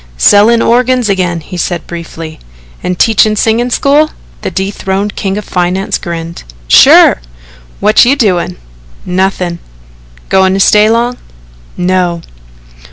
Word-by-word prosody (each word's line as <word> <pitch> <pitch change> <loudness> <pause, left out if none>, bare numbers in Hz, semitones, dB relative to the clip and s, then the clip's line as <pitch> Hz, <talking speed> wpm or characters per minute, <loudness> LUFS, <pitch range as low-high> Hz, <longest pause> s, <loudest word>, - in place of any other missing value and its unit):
"Sellin' 215 - +4
organs 250 -2 +1
agin," 180 -3 -2
he 180 +4 -9
said 175 -1 -3
briefly. 165 -2 -9 0.4
"And 180 - -3
teaching 215 0 +2
singing 225 +3 0
school?" 290 +5 +2 0.3
The - - -3
dethroned 195 +1 -3
king 195 0 -3
of 210 - -6
finance 180 +2 -2
grinned. 170 0 -6 0.3
"Sure! - - +6 0.6
What 210 +1 +4
you 255 +3 +3
doin'?" 180 - -1 0.5
"Nothing." 180 -1 -2 0.7
"Goin' 190 0 +2
to - - -1
stay 210 +2 +4
long?" 240 +2 0 0.6
"No." 180 -2 -1
190 Hz, 120 wpm, -10 LUFS, 175-220 Hz, 0.7 s, Sure